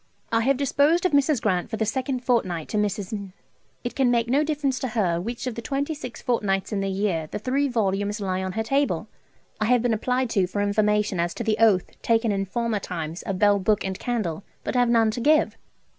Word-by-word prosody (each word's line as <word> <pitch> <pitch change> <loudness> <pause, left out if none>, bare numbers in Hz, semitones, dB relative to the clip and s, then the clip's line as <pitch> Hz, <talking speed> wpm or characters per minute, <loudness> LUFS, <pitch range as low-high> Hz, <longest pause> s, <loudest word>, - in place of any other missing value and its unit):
I 225 0 +3
have 265 +3 +2
disposed 285 +5 +2
of 365 - +3
Mrs. 285 -1 +3
Grant 185 -4 0
for 220 - -3
the 220 - 0
second 255 +3 -2
fortnight 185 -11 0
to 215 - -2
Mrs.. 205 -1 -2 0.5
It 240 - -3
can 265 -3 +2
make 235 -1 +2
no 275 +5 +3
difference 295 -4 -1
to 260 - -2
her 190 -8 0
which 235 +6 -5
of 250 - -2
the 235 - -6
twenty 280 +4 -2
six 255 -5 -8
fortnights 205 -6 0
in 200 - 0
the 195 0 -1
year 190 -5 -1
the - - -4
3 270 +6 0
vols. 205 -3 0
lie 190 -2 -1
on 190 -1 -3
her 220 - -1
table. 275 +5 0 0.5
I 215 - +1
have 245 +1 +3
been 240 -2 +2
applied 250 +2 0
to 195 -5 +2
for 205 - -4
information 210 -1 +1
as 170 0 -1
to - - -3
the 215 -1 +1
oath 215 -5 +2
taken 230 -1 +2
in 195 -1 -1
former 230 +2 -1
times 165 -3 -5
of 195 - -3
Bell, 205 0 +4
Book, 205 +2 +1
and 190 -1 -4
Candle, 205 -8 -2 0.2
but - - -3
have 245 -1 +3
none 225 -2 +4
to 235 - -4
give. 305 +4 +3
220 Hz, 225 wpm, -25 LUFS, 195-250 Hz, 0.5 s, Bell